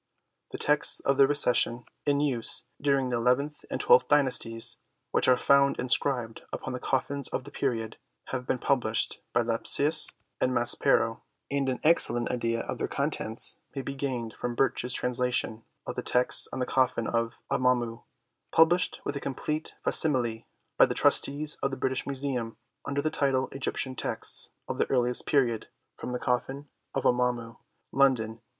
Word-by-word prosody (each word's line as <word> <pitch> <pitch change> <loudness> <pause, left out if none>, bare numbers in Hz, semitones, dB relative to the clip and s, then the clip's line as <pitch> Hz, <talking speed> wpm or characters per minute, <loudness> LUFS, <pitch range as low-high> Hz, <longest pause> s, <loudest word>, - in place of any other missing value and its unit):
The - - -7
texts 150 0 +2
of 140 0 0
the 135 - +6
Recension 125 -4 +2 0.2
in 145 0 +2
use 130 -6 0 0.2
during 140 -2 +1
the 120 - -1
eleventh 125 +5 0
and - - -3
twelfth 470 +3 +4
dynasties, 125 -5 +1 0.3
which - - +3
are 130 -1 +5
found 140 +1 +3
in 125 - -3
scribed 120 -5 0
upon 130 - -5
the 125 - -4
coffins 140 +1 -2
of - - -4
the 145 - -12
period, 115 -6 -3 0.3
have 125 -1 -4
been - - 0
published 120 -4 0
by 120 - +2
Lepsius 140 +7 +4 0.3
and 130 - 0
Maspero, 120 -1 +2 0.3
and 140 -1 0
an 130 - -3
excellent 150 -7 +2
idea 115 -2 -2
of - - -6
their - - -2
contents 110 +1 -1 0.2
may 135 - -4
be 140 - -5
gained 130 -5 -4
from 120 -1 -4
Birch's 125 -1 0
trans 125 0 +1
lation 125 -3 -1 0.2
of - - -5
the - - -3
text 125 0 +2
on - - -5
the 130 - -1
coffin 125 -3 0
of 115 +1 -2 0.2
Amamu, 120 -2 0 0.5
published 175 +2 +3
with - - -3
a - - -2
complete 150 +3 -4
facsimile 120 -7 +2 0.3
by - - +6
the - - -4
Trustees 150 +2 +4
of 135 - 0
the 135 - -6
British 130 0 -2
Museum 130 -4 -3 0.3
under 140 0 -2
the 155 - -1
title 135 -2 0
Egyptian 130 -1 -3
Texts - - +1 0.2
of - - -5
the - - 0
earliest 125 -2 +2
period 120 -6 +1 0.3
from - - -7
the 125 - -2
coffin 135 +4 -3 0.3
of - - -1
Amamu, 125 -2 0 0.3
London, 130 -5 +2
1886. - - -42
130 Hz, 170 wpm, -27 LUFS, 120-140 Hz, 0.5 s, the